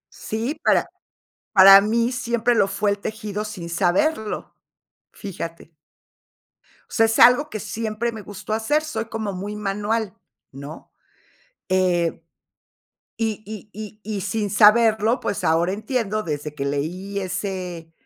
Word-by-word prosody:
Sí, 230 +8 -4
para - - +2 0.6
para 195 -1 +10
mí 230 +3 +1
siempre 240 -1 0
lo 200 - +3
fue 200 +1 0
el 200 - 0
tejido, 210 0 -5
sin 185 -6 -7
saberlo. 205 - 0 0.6
Fíjate. 170 -4 -8 1.2
O - - -25
sea, 225 - +4
es 225 0 0
algo 250 +5 +6
que 215 - -5
siempre 220 +2 -3
me 220 -2 -8
gustó 205 +2 -6
hacer, 260 +8 +1
soy 310 -6 -4
como 220 -2 -4
muy 200 +3 -5
manual, 210 0 -2 0.4
¿no? 140 +3 -10 0.8
Eh, 180 -3 +1 1.0
y 220 -2 -2
y 215 0 -9
y 215 0 -9
y 210 -2 -4
sin 210 +2 -2
saberlo, 220 +2 +5
pues 200 -1 -3
ahora 170 +2 +2
entiendo 215 0 -2
desde 150 -2 -4
que 140 -2 -3
leí 175 +8 -3
ese 185 -3 -5
210 Hz, 135 wpm, -22 LUFS, 185-220 Hz, 1.2 s, para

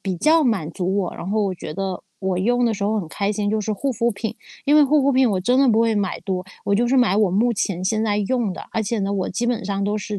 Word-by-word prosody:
比 190 -2 -3
较 310 - +4
满 195 -10 0
足 185 +3 -2
我， 180 -3 -2
然 175 - -6
后 215 +2 +1
我 195 -2 0
觉 155 -3 -8
得 190 -1 -4 0.2
我 190 -2 -1
用 245 +5 +2
的 225 - +1
时 200 - -3
候 215 +1 +1
很 165 - -8
开 200 +4 -1
心 205 -1 -2
就 215 +1 0
是 215 +1 -2
护 270 +7 -2
肤 235 +1 0
品。 220 +2 -5 0.3
因 290 +2 +5
为 300 - +7
护 295 +2 +3
肤 275 +1 +3
品 260 -3 +3
我 185 -2 0
真 245 +7 +2
的 275 - +5
不 225 0 +4
会 230 -1 +2
买 200 -3 -2
多， 185 -2 -3 0.2
我 200 - +1
就 240 +4 +2
是 265 - +2
买 240 -7 +3
我 210 -4 +3
目 230 +6 +2
前 195 -4 -2
现 215 +3 0
在 205 -1 0
用 225 -1 0
的， - - -8
而 225 - 0
且 220 +2 -2
呢 200 0 -1
我 195 -2 -1
基 235 +6 -2
本 240 -3 -1
上 200 0 -2
都 205 +1 0
是 205 0 -4
210 Hz, 325 characters per minute, -21 LUFS, 195-235 Hz, 0.3 s, 为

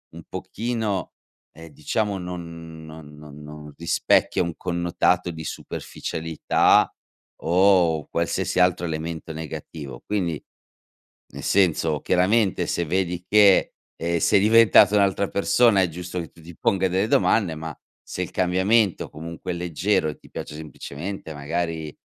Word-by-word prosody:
un 85 - -9
pochino, 100 +1 -3 0.4
ehm, 80 +1 -12
diciamo, 100 +8 -2
non 85 -3 -8
non 80 -1 -12
non 75 -1 -12
non 75 0 -10
rispecchia 85 +2 +2
un 85 -2 -4
connotato 85 0 0
di 80 -1 -8
superficialità 80 +1 0 0.5
o 85 -3 +3
qualsiasi - - -1
altro 90 -1 +3
elemento 80 0 -5
negativo. 75 -4 -8
Quindi, 90 -7 -1 0.9
nel - - -8
senso, 80 -5 +2
chiaramente 95 +3 +2
se 85 - -1
vedi 90 0 -1
che, 100 -2 +5 0.2
ehm, 85 +1 -1
sei 90 - +4
diventata 105 -1 +6
un'altra 100 0 +2
persona, 110 +1 +3
è 90 - +1
giusto 90 +2 -6
che 85 - -7
tu 85 - -19
ti 85 +2 -12
ponga 95 -1 +1
delle 95 +4 0
domande, 100 -8 +2
ma 80 0 -6 0.3
se - - -5
il - - -4
cambiamento 95 +3 +2
comunque 85 +3 -6
è - - -3
leggero 90 +1 0
e 75 - -5
ti - - -19
piace 75 - -7
semplicemente 80 +3 -7
magari 80 +1 -3
85 Hz, 135 wpm, -23 LUFS, 80-95 Hz, 0.9 s, diventata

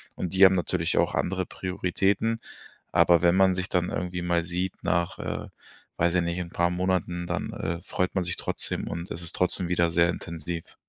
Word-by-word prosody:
Und 90 0 -4
die 95 +1 +5
haben 95 0 +8
natürlich 90 -2 0
auch - - +2
andere 95 0 0
Prioritäten. 95 +4 0 0.5
Aber 85 -2 +5
wenn 85 0 +4
man 95 -1 +5
sich 90 0 -3
dann 90 -1 0
irgendwie 90 0 -3
mal 85 -1 +1
sieht 90 +2 -2
nach, 85 0 0
äh, - - -4 0.5
weiß 85 +1 +2
ich 90 - +4
nicht, 85 +1 -2
'n 85 -1 -4
paar 85 0 +1
Monaten, 90 -1 -1
dann, - - -3
äh, 85 +1 -3
freut 90 0 -2
man 95 - +1
sich 85 - -3
trotzdem, - - -2
und 85 +1 -5
es 85 - -4
ist 85 - -6
trotzdem 90 0 0
wieder 85 -1 +2
sehr 85 +1 +4
intensiv. 85 -1 -5
90 Hz, 200 wpm, -27 LUFS, 85-90 Hz, 0.5 s, haben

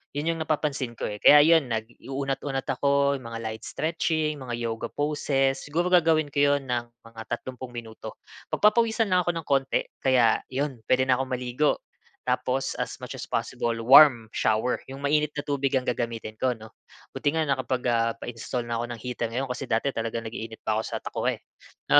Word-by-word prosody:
'Yun 160 +3 0
yung - - -8
napapansin 150 -5 -1
ko - - -8
eh, 105 0 -6
kaya 150 - +9
'yun 160 -3 +5
nag-unat-unat 135 +4 -3
ako, 140 +1 +2
mga 115 -2 -7
light 110 0 -5
stretching, 155 -1 -1
mga 125 -3 -4 0.2
yoga 115 +1 -4
poses. 140 -2 0
Siguro, 165 +5 -1
gagawin 160 -3 +4
ko 140 - -1
yun 140 -1 -1
ng 120 -1 0 0.2
mga 115 -1 -11
tatlumpung 125 +1 -5
minuto. 115 -2 -8 0.4
Pagpapawisan 225 +1 +3
lang 180 -1 +4
ako 175 - 0
ng 160 - -10
konti, 135 -1 +2 0.2
kaya 125 -4 +4
yun, 135 -1 -2
pwede 130 0 +3
na 130 - +6
akong 130 0 -3
maligo. 125 +4 0 0.4
Tapos, 125 +1 0
as - - -3
much - - -7
as - - -6
possible, 115 -1 -1
warm 125 -3 +7
shower, 110 +3 +1
yung 135 +1 -9
mainit 150 +1 +1
na 145 - -3
tubig 140 -1 -1
ang 130 - +2
gagamitin 115 -3 -3
ko, 130 -1 +1
'no. 110 0 -13 0.4
Buti 145 +2 -1
nga 160 - +2
nakapag 130 -3 -1
ah, 115 0 +2
pa-install 120 +1 -5
na 115 -1 -3
ako 120 - -1
ng - - -13
heater 125 -1 -3
ngayon 125 +4 -3
kasi 125 +1 -5
dati 115 +5 +1
talagang 115 -1 -3
nag-iinit 110 0 -7
pa 110 0 0
ako - - 0
sa - - -5
takure, - - -2 0.5
'no.. - - +9
130 Hz, 185 wpm, -26 LUFS, 115-145 Hz, 0.5 s, kaya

